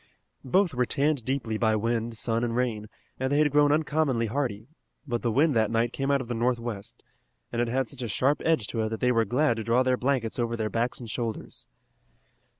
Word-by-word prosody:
Both 180 +5 +2
were 125 -1 0
tanned 145 -2 +1
deeply 120 -5 -2
by 110 -2 +3
wind, 115 +1 -1
sun 115 +1 -1
and 115 -1 -1
rain, 115 -4 -1 0.3
and 130 +1 -1
they 145 - +2
had 150 -1 +3
grown 145 0 +4
uncommonly 150 -5 +1
hardy, 110 -3 -2 0.4
but 120 -2 -2
the 120 - 0
wind 145 +4 +3
that 110 -2 +3
night 115 +1 0
came 135 0 -2
out 140 -1 +2
of 125 - -7
the 120 - -3
northwest, 120 -3 -3 0.5
and 120 - -1
it 120 - +1
had 130 +2 0
such 110 - -8
a 120 - -2
sharp 130 +8 +1
edge 160 -9 +2
to 115 - -2
it 110 - -1
that 110 -1 -4
they 125 - +2
were 115 -2 +2
glad 125 +3 +1
to 110 - -3
draw 120 +3 +3
their 130 0 +2
blankets 125 -3 -1
over 115 0 -1
their 110 -1 -2
backs 120 +2 -1
and 115 -3 -7
shoulders. 115 -1 -5
120 Hz, 225 wpm, -27 LUFS, 115-135 Hz, 0.5 s, grown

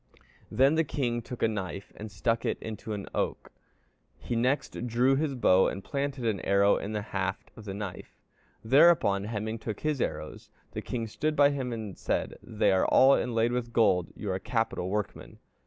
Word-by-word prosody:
Then 135 +6 +4
the 160 +1 +3
king 120 -5 -2
took 125 +1 -7
a - - +5
knife 100 -2 -5
and 105 0 -8
stuck 115 +4 0
it - - -1
into 110 0 -6
an 100 -2 -5
oak; - - -2 0.7
he 120 - -4
next 125 0 -1
drew 125 +3 +3
his 145 -1 -1
bow 95 -6 +4
and 95 - -4
planted 140 -3 -3
an 110 -4 0
arrow 100 +1 +3
in 105 - -5
the 105 -1 -2
haft 95 0 -3
of 110 - -12
the 95 -2 -5
knife. 100 -3 -7 0.5
Thereupon 115 -6 +5
Hemingr 110 0 -4
took 110 -3 -5
his 150 -4 -1
arrows. 75 0 -4 0.2
The - - -5
king 115 -2 -3
stood 155 +8 -2
by 145 0 +5
him 130 -3 -3
and 110 -5 -5
said, - - -1
'They - - +1
are 95 - +3
all 135 +1 +6
inlaid 115 -3 +1
with 120 -1 -2
gold; 90 -7 +3
you 105 - -4
are - - 0
a 95 - -2
capital 115 -5 -1
workman.' 105 +1 -4
115 Hz, 190 wpm, -28 LUFS, 100-130 Hz, 0.7 s, all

